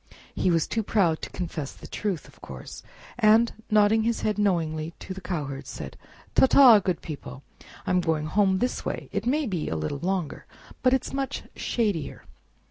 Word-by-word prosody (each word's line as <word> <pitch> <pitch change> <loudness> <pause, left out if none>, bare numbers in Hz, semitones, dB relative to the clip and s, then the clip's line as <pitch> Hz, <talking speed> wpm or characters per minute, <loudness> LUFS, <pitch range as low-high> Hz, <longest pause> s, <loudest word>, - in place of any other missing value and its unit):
He 185 - +1
was 165 -2 +2
too 225 - -1
proud 190 -7 +1
to - - -5
confess 165 -6 -5
the - - -14
truth, 195 -7 -3
of - - -20
course, - - -9 0.4
and, 225 +1 +5 0.2
nodding 215 +1 +4
his 230 +1 0
head 210 -1 0
knowingly 165 -5 0
to 190 - -7
the 190 - -9
cowherds, 145 -7 -4
said: - - -7 0.4
"Ta 265 - +6
ta, 250 -6 +8
good 185 -2 -2
people! 140 -3 -8 0.4
I - - -1
am 180 0 +3
going 160 -3 0
home 190 +3 +2
this 250 +5 -1
way. - - -4
It - - -2
may 295 +4 +2
be 180 -9 -2
a 80 - -2
little 80 - -3
longer, 180 -1 -3 0.3
but 255 0 +4
it's 265 - -1
much 270 -1 -3
shadier." 205 - -2
190 Hz, 185 wpm, -26 LUFS, 160-220 Hz, 0.4 s, ta